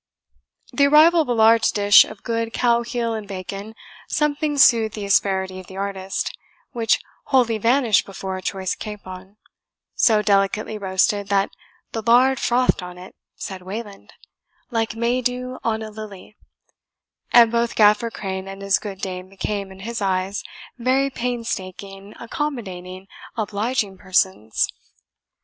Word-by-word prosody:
The 280 0 +4
arrival 320 +3 +6
of 310 - -3
a - - -1
large 225 0 +5
dish 205 0 +6
of 215 - -12
good 230 -1 -2
cow 235 -1 +2
heel 235 -1 -2
and 215 -2 -5
bacon 195 +3 -7 0.3
something 300 0 0
soothed 225 -5 +5
the 210 -2 -5
asperity 190 -1 +1
of 185 - -12
the 190 - -10
artist, 195 -1 -3 0.4
which 230 -4 +1 0.3
wholly 240 -5 +2
vanished 235 0 +3
before 190 -1 -5
a 185 - -6
choice 190 -1 -2
capon, 195 -2 -9 0.6
so 215 -2 +3
delicately 205 +1 +1
roasted 195 +1 +1
that 200 -1 +1 0.4
the 225 - -3
lard 250 +4 +4
frothed 250 -3 +2
on 180 0 -9
it, 180 +1 -12 0.2
said 190 -1 -7
Wayland, 200 +2 -8 0.6
like 225 -2 -1
May 235 +2 0
dew 250 +1 -3
on 220 -1 -1
a 215 - -7
lily; 210 -1 -10 1.0
and 235 -2 +7
both 235 0 0
Gaffer 210 +2 +4
Crane 190 -3 -5
and 195 0 -8
his 195 0 +2
good 200 -2 -8
dame 185 -1 -5
became, 195 0 -4
in 190 0 -12
his 230 +1 -5
eyes, 190 0 -1 0.4
very 265 +3 +1
painstaking, 200 -5 -5
accommodating, 195 -9 -5 0.3
obliging 210 -1 -2
persons. 185 - +1
210 Hz, 140 wpm, -22 LUFS, 195-235 Hz, 1.0 s, and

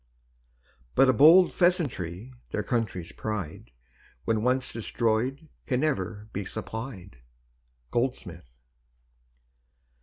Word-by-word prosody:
But 135 - +6
a - - +5
bold 165 +8 +7
pheasantry, 130 - 0 0.2
their 105 - -2
country's 100 -7 -2
pride 95 - -5 0.6
When 110 +4 +1
once 125 +2 +1
destroyed 120 +6 -1 0.2
can 125 -1 +1
never 110 -8 -2
be 100 - -2
supplied. 110 - -6 0.7
GOLDSMITH. 90 - -3
115 Hz, 90 wpm, -27 LUFS, 100-130 Hz, 0.7 s, bold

